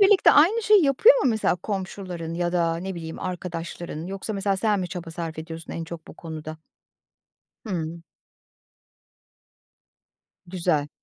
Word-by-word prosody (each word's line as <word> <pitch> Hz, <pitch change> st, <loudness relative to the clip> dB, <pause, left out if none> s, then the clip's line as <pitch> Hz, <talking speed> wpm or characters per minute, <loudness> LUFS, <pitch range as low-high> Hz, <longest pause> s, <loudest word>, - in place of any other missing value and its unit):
birlikte 395 Hz, -1 st, +7 dB
aynı 375 Hz, +11 st, +5 dB
şeyi 420 Hz, -4 st, +6 dB
yapıyor 290 Hz, -, +7 dB
mu 255 Hz, -, +4 dB
mesela, 220 Hz, -5 st, +1 dB
komşuların 185 Hz, -3 st, -5 dB
ya 175 Hz, 0 st, -1 dB
da 165 Hz, -2 st, +1 dB
ne 190 Hz, +3 st, -4 dB
bileyim 165 Hz, -1 st, -6 dB
arkadaşların? 170 Hz, -2 st, -5 dB
Yoksa 195 Hz, +3 st, -4 dB
mesela, 195 Hz, -1 st, 0 dB
sen 210 Hz, 0 st, +1 dB
mi 180 Hz, -, -3 dB
çaba 170 Hz, -2 st, -6 dB
sarf 165 Hz, -1 st, -5 dB
ediyorsun 160 Hz, +1 st, -7 dB
en 165 Hz, -, -4 dB
çok 165 Hz, -1 st, -9 dB
bu -, -, -10 dB
konuda? 155 Hz, -1 st, -7 dB, 1.1 s
Hımm. 170 Hz, -4 st, -3 dB, 2.4 s
Güzel. 170 Hz, -5 st, 0 dB
175 Hz, 135 wpm, -25 LUFS, 165-200 Hz, 2.4 s, birlikte